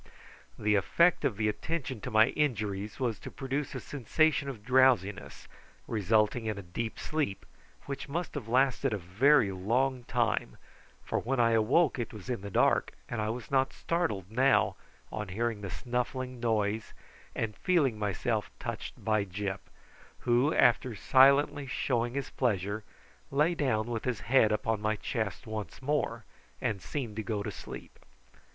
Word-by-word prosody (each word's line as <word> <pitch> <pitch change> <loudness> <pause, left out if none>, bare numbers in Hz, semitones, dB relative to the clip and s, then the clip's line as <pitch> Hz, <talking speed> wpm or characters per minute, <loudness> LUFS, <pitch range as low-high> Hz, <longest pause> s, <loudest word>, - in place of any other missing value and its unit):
The 105 0 +1
effect 170 - +3
of 105 - 0
the 110 -1 +1
attention 130 +1 -3
to - - -4
my 110 +2 +5
injuries 105 -8 -1
was 120 -5 -1
to - - -8
produce 140 +1 -3
a - - -2
sensation 145 +2 +1
of 110 -6 -8
drowsiness, 125 -6 +2 0.4
resulting 110 +2 +1
in 110 -2 -2
a 100 - -6
deep 110 +6 -4
sleep, 150 -11 -2 0.4
which 140 0 -5
must 170 +4 -3
have 135 -7 -5
lasted 130 +1 +2
a - - 0
very 100 - +3
long 125 +7 0
time, 60 - 0 0.5
for - - 0
when 135 +2 -1
I 115 -1 +4
awoke 125 +7 +3
it 115 - -4
was 105 +4 -6
in 120 - -3
the 100 - -6
dark, - - +2 0.2
and 120 -2 -2
I 105 - -1
was 120 +3 -5
not 135 -1 +2
startled 135 - -2
now 130 +4 +3 0.4
on 105 -1 -4
hearing 110 +3 -2
the 100 - -5
snuffling 125 +2 -3
noise 110 -2 0 0.4
and 110 -2 -2
feeling 145 -12 +2
myself 100 -3 -1
touched - - -6
by 110 -2 +2
Gyp, 100 0 -4 0.6
who, 125 +4 +3
after 125 -3 +3
silently 140 +5 +4
showing 120 -1 -1
his 140 -1 -3
pleasure, 105 -3 -1 0.5
lay 150 +5 +2
down 130 -9 0
with 115 -2 -3
his 125 -4 -1
head 115 -4 +4
upon 105 0 0
my 110 0 +1
chest 110 -3 -3
once 110 -2 -6
more, 130 -5 -1 0.3
and 100 -3 -2
seemed 115 -2 -5
to - - 0
go 105 0 -2
to - - -4
sleep. - - -10
115 Hz, 160 wpm, -30 LUFS, 105-135 Hz, 0.6 s, my